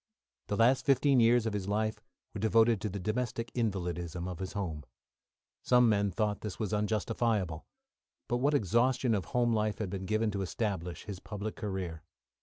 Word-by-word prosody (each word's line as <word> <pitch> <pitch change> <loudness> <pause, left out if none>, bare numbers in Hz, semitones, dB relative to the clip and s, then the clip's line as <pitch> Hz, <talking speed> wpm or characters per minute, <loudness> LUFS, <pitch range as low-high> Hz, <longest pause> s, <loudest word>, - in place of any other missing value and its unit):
The 105 - -1
last 125 +3 +4
fifteen 135 -1 +4
years 115 0 +4
of 110 - -1
his 100 -2 -3
life 110 +1 -1 0.3
were - - -5
devoted 110 0 +3
to 105 - -2
the 100 - -5
domestic 115 +3 -2
invalidism 90 -6 -2
of 90 -2 -6
his 95 -1 -5
home. 85 -7 -3 0.8
Some 125 -1 +5
men 100 -1 +2
thought 105 +2 -1
this 105 -3 -5
was 110 -2 -2
unjustifiable. 105 -4 0 0.6
But 120 - 0
what 145 +4 +2
exhaustion 120 +2 +2
of 100 -5 0
home 120 +5 +1
life 105 -1 0
had 100 -4 -3
been 95 -1 -4
given 110 0 +1
to 100 -1 -2
establish 95 -3 -3
his 100 -3 -7
public 105 +2 -5
career! 95 -6 -4
105 Hz, 175 wpm, -31 LUFS, 95-115 Hz, 0.8 s, Some